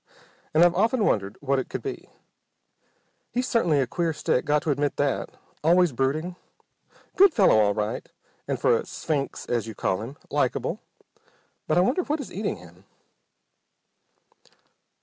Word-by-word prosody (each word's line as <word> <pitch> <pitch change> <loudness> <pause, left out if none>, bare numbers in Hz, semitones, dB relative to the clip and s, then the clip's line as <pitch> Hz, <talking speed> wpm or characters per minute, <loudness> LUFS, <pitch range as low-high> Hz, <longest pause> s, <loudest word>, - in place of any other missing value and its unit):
And 160 - +7
I've 175 0 +5
often 220 +4 +2
wondered 100 -1 0
what 140 -1 +1
it 130 - -5
could - - -5
be. 405 - -6 1.2
He 250 - -1
certainly's 170 - +2
a - - -2
queer 165 +6 -1
stick. 140 -4 0
Got 150 0 +2
to 155 - 0
admit 145 +1 0
that. 145 -1 -1 0.3
Always 175 +1 +4
brooding. 150 +8 -1 0.8
Good 390 -3 +6
fellow 190 - +5
all 100 -1 +3
right, 105 0 -3 0.4
and, - - -2
for - - +4
a - - -1
'sphinx' 145 -4 -3
as 120 -2 -1
you 110 - -7
call 95 0 -1
him, 125 +6 -8
likable. - - 0 0.9
But - - +2
I - - +6
wonder 250 - +2
what 310 -2 -2
is 280 - -7
eating 205 +2 -2
him?" 90 +2 -16
150 Hz, 155 wpm, -25 LUFS, 125-185 Hz, 1.2 s, And